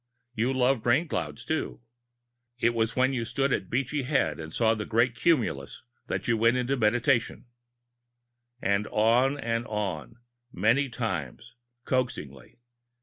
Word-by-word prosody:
You 120 Hz, +2 st, 0 dB
loved 130 Hz, -2 st, +2 dB
Rainclouds, 150 Hz, +7 st, 0 dB
too. 160 Hz, 0 st, -2 dB, 0.8 s
It 120 Hz, -1 st, +2 dB
was 115 Hz, 0 st, 0 dB
when 130 Hz, +1 st, +2 dB
you 120 Hz, -3 st, -1 dB
stood 135 Hz, +4 st, 0 dB
at 95 Hz, -, -2 dB
Beachy 135 Hz, +4 st, -1 dB
Head 130 Hz, -, 0 dB
and 80 Hz, 0 st, -7 dB
saw 110 Hz, +5 st, +2 dB
a 110 Hz, -1 st, -1 dB
great 115 Hz, +3 st, +2 dB
cumulus 120 Hz, -, 0 dB, 0.2 s
that -, -, -3 dB
you 115 Hz, -, +2 dB
went 115 Hz, +3 st, +3 dB
into 125 Hz, +2 st, 0 dB
Meditation 120 Hz, +2 st, +1 dB, 0.6 s
" 120 Hz, 0 st, -47 dB
And 100 Hz, +2 st, 0 dB
on 120 Hz, +6 st, +2 dB
and 115 Hz, -1 st, -2 dB
on, 105 Hz, -3 st, -3 dB, 0.4 s
many 115 Hz, +9 st, +2 dB
times, 110 Hz, -, -4 dB, 0.3 s
coaxingly. 75 Hz, -, -3 dB
120 Hz, 140 wpm, -27 LUFS, 110-130 Hz, 0.8 s, went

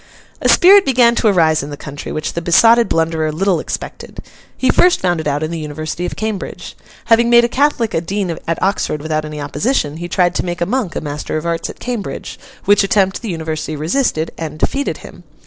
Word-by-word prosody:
A -, -, +2 dB
spirit 390 Hz, +2 st, +7 dB
began 245 Hz, -6 st, +4 dB
to 235 Hz, -, +1 dB
arise 160 Hz, -6 st, +3 dB
in 140 Hz, -, -7 dB
the 145 Hz, -, -7 dB
country, 145 Hz, -1 st, -8 dB
which 155 Hz, -, -3 dB
the 170 Hz, -, -3 dB
besotted 225 Hz, +8 st, +5 dB
blunderer 160 Hz, -1 st, 0 dB
little 180 Hz, +2 st, 0 dB
expected. -, -, -7 dB, 0.4 s
He 260 Hz, -, +2 dB
first 360 Hz, 0 st, +4 dB
found 175 Hz, -3 st, 0 dB
it 155 Hz, -, -5 dB
out 145 Hz, +1 st, -1 dB
in 155 Hz, -, -3 dB
the 165 Hz, -, -4 dB
University 155 Hz, +3 st, -4 dB
of -, -, -6 dB
Cambridge. 215 Hz, -3 st, -5 dB, 0.3 s
Having 235 Hz, +1 st, +4 dB
made 235 Hz, 0 st, +6 dB
a -, -, +3 dB
Catholic 255 Hz, -3 st, 0 dB
a 165 Hz, -, 0 dB
dean 185 Hz, -1 st, -2 dB
at 165 Hz, -, -1 dB
Oxford 185 Hz, -6 st, -1 dB
without 155 Hz, -1 st, -2 dB
any 150 Hz, 0 st, -7 dB
opposition, 150 Hz, -, -1 dB
he 175 Hz, +1 st, -5 dB
tried 175 Hz, 0 st, +1 dB
to -, -, -1 dB
make 175 Hz, -1 st, -4 dB
a 170 Hz, -, +1 dB
monk 215 Hz, -4 st, -2 dB
a -, -, -2 dB
master 150 Hz, 0 st, -4 dB
of 155 Hz, -, -5 dB
arts 170 Hz, -1 st, -2 dB
at -, -, -9 dB
Cambridge: 240 Hz, -5 st, -5 dB, 0.3 s
which 205 Hz, 0 st, +4 dB
attempt 195 Hz, -1 st, +1 dB
the 230 Hz, -, -5 dB
University 160 Hz, -2 st, -4 dB
resisted, 160 Hz, -, -1 dB
and 155 Hz, -2 st, -5 dB
defeated 275 Hz, -, -1 dB
him. -, -, -13 dB
175 Hz, 215 wpm, -17 LUFS, 155-225 Hz, 0.4 s, spirit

